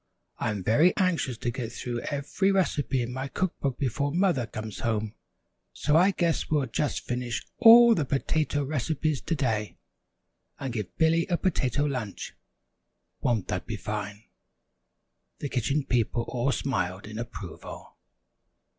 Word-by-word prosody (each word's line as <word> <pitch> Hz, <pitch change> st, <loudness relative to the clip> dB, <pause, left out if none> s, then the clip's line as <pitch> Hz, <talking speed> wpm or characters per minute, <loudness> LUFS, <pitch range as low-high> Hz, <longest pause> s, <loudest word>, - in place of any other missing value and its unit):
"I -, -, 0 dB
am 105 Hz, -3 st, -3 dB
very 150 Hz, -, +4 dB
anxious 170 Hz, -, +1 dB
to 120 Hz, -, -2 dB
get 120 Hz, -2 st, -5 dB
through 120 Hz, 0 st, -4 dB
every 145 Hz, +8 st, 0 dB
recipe 145 Hz, -8 st, +1 dB
in 120 Hz, +1 st, -5 dB
my 130 Hz, +1 st, -3 dB
cook 180 Hz, +6 st, -2 dB
book 135 Hz, -3 st, -1 dB
before 140 Hz, +1 st, -1 dB
Mother 170 Hz, -, +1 dB
comes 110 Hz, -2 st, -6 dB
home, 110 Hz, -3 st, -1 dB, 0.6 s
so 150 Hz, -, +1 dB
I 180 Hz, +4 st, +6 dB
guess 170 Hz, -4 st, 0 dB
we'll 150 Hz, -3 st, +2 dB
just 135 Hz, +4 st, -1 dB
finish 125 Hz, -1 st, -3 dB
all 235 Hz, 0 st, +9 dB
the 165 Hz, -, +1 dB
potato 145 Hz, +2 st, 0 dB
recipes 150 Hz, +1 st, -1 dB
to 165 Hz, -, -1 dB
day, 110 Hz, -7 st, -1 dB, 0.8 s
and 135 Hz, -3 st, -4 dB
give 105 Hz, -5 st, -5 dB
Billy 165 Hz, +1 st, +3 dB
a 175 Hz, -, +1 dB
Potato 145 Hz, -6 st, 0 dB
Lunch! 125 Hz, -8 st, -4 dB, 0.9 s
Won't 115 Hz, -6 st, 0 dB
that 90 Hz, -, -3 dB
be 110 Hz, -2 st, -3 dB
fine?" 105 Hz, 0 st, -5 dB, 1.1 s
The 145 Hz, -, -4 dB
Kitchen 135 Hz, +3 st, 0 dB
People 120 Hz, -1 st, +1 dB
all 125 Hz, +2 st, 0 dB
smiled 95 Hz, -8 st, -2 dB
in 110 Hz, +1 st, -7 dB
approval. 110 Hz, -7 st, -8 dB
130 Hz, 145 wpm, -27 LUFS, 115-155 Hz, 1.1 s, all